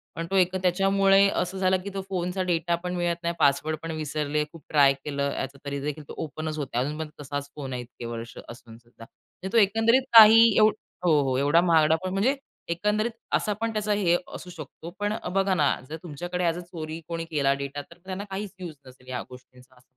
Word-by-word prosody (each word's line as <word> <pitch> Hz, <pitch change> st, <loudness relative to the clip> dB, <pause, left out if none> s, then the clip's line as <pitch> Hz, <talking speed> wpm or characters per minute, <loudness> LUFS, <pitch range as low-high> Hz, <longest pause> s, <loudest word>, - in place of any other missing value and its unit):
पण 165 Hz, -, -3 dB
तो -, -, 0 dB
एक 185 Hz, -1 st, +3 dB
त्याच्यामुळे 195 Hz, +2 st, +4 dB
असं 190 Hz, -1 st, -2 dB
झालं 185 Hz, 0 st, +2 dB
की 200 Hz, -, -5 dB
तो 195 Hz, -, -3 dB
फोनचा 180 Hz, 0 st, -2 dB
डेटा 170 Hz, -1 st, 0 dB
पण 180 Hz, 0 st, -3 dB
मिळत 175 Hz, -1 st, 0 dB
नाही, 170 Hz, 0 st, -1 dB
पासवर्ड 150 Hz, +3 st, +2 dB
पण 165 Hz, -, -4 dB
विसरले, 150 Hz, -1 st, -2 dB
खूप 165 Hz, -4 st, -14 dB
ट्राय 140 Hz, -2 st, +5 dB
केलं 140 Hz, 0 st, -3 dB
याचं 135 Hz, +1 st, -5 dB
तरीदेखील 140 Hz, +2 st, -4 dB
तो -, -, -8 dB
ओपनच 155 Hz, +1 st, -5 dB
होत 145 Hz, -3 st, -3 dB
नाही. 125 Hz, +2 st, +1 dB
अजून 150 Hz, +2 st, -4 dB
पण 160 Hz, -1 st, -4 dB
तसाच 145 Hz, 0 st, -5 dB
फोन 135 Hz, -3 st, -6 dB
आहे 125 Hz, -, -3 dB
इतके 120 Hz, 0 st, -10 dB
वर्ष 115 Hz, 0 st, -7 dB
असूनसुद्धा. 115 Hz, 0 st, -13 dB, 0.5 s
तो -, -, +4 dB
एकंदरीत 225 Hz, +4 st, +4 dB, 0.2 s
काही 220 Hz, 0 st, +10 dB, 0.2 s
एव 215 Hz, 0 st, +7 dB, 0.4 s
हो, 155 Hz, -4 st, +4 dB
हो, 130 Hz, -1 st, 0 dB
एवढा 145 Hz, +5 st, +4 dB
महागडा 160 Hz, -3 st, +4 dB
फोन 185 Hz, 0 st, -3 dB
म्हणजे 220 Hz, +9 st, +2 dB, 0.3 s
एकंदरीत 210 Hz, +6 st, 0 dB, 0.2 s
असा 210 Hz, -, +1 dB
पण 230 Hz, 0 st, -1 dB
त्याचा 215 Hz, -1 st, -1 dB
हे 180 Hz, -4 st, +2 dB, 0.2 s
असू 180 Hz, -, -9 dB
शकतो 165 Hz, 0 st, -9 dB
पण 205 Hz, 0 st, 0 dB, 0.2 s
बघा 195 Hz, 0 st, +2 dB
ना, 150 Hz, -5 st, +3 dB, 0.2 s
जर 155 Hz, -, -5 dB
तुमच्याकडे 175 Hz, +3 st, -4 dB
ॲज 170 Hz, -1 st, +1 dB
अ -, -, -5 dB
चोरी 165 Hz, -2 st, -7 dB
कोणी 165 Hz, -1 st, -4 dB
केला 145 Hz, -4 st, +1 dB
डेटा 140 Hz, +1 st, -4 dB
तर -, -, -14 dB
त्यांना 190 Hz, +1 st, -5 dB
काहीच 195 Hz, +1 st, -5 dB
यूज 175 Hz, -4 st, -7 dB
नसेल 130 Hz, 0 st, -17 dB
या 125 Hz, -, -3 dB
गोष्टींचा 125 Hz, 0 st, -16 dB
असं. 125 Hz, -, -22 dB
165 Hz, 205 wpm, -26 LUFS, 140-190 Hz, 0.5 s, काही